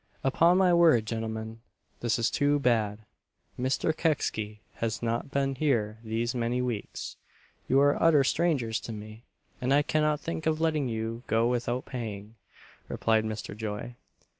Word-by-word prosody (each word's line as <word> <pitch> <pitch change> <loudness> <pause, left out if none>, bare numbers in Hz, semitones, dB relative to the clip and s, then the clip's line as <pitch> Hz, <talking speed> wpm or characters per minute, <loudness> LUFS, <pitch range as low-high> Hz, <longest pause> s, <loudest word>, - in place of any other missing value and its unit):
"Upon 165 +7 +4
my 185 -2 +4
word, 165 -10 +5
gentlemen, 110 0 -4 0.4
this 120 -2 0
is 115 -1 +1
too 145 0 +2
bad 110 -6 +1 0.6
Mr. 130 +5 0
Kecksy 110 -10 -1 0.2
has 115 0 -2
not 115 +3 -1
been 140 -1 0
here 115 -7 0
these 115 +2 -1
many 120 0 -1
weeks; 120 -4 -4 0.5
you 135 - +5
are 145 0 +3
utter 155 -4 +5
strangers 135 -8 +1
to 115 - -7
me, 110 +2 -9 0.4
and 125 +1 0
I 145 +1 +5
cannot 150 0 +1
think 165 -1 -4
of 155 0 +1
letting 155 -4 +1
you 115 +1 -3
go 115 +1 +2
without 120 +1 -1
paying," 110 -4 -6 0.5
replied 110 -1 +1
Mr. 105 -2 -5
Joy. 105 +2 -5
120 Hz, 150 wpm, -28 LUFS, 110-145 Hz, 0.6 s, word